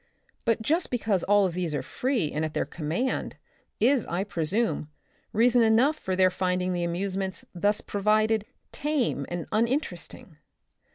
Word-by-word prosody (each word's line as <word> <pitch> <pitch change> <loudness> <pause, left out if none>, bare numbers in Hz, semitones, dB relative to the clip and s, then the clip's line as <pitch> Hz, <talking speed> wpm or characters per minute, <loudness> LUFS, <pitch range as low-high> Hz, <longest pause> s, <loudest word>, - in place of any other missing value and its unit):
But 230 -1 +1
just 325 +9 +1
because 215 -6 0
all 205 -1 +4
these 175 -3 -2
are 135 - -2
free 245 - -1
and 155 - -2
at 155 -1 -3
their - - +1
command, 170 - -2 0.4
is, 250 +1 +3
I 175 +3 -1
presume, 190 -1 -1 0.4
reason 235 +2 +4
enough 230 +7 +4
for 190 -11 -3
their 185 0 +4
finding 180 0 0
the 175 -1 -1
amusements 190 +2 -2
thus 205 +4 +1
provided 215 +1 +1 0.3
tame 275 - -1
and 175 -2 -4
uninteresting. 235 +7 -2
205 Hz, 140 wpm, -27 LUFS, 180-230 Hz, 0.4 s, all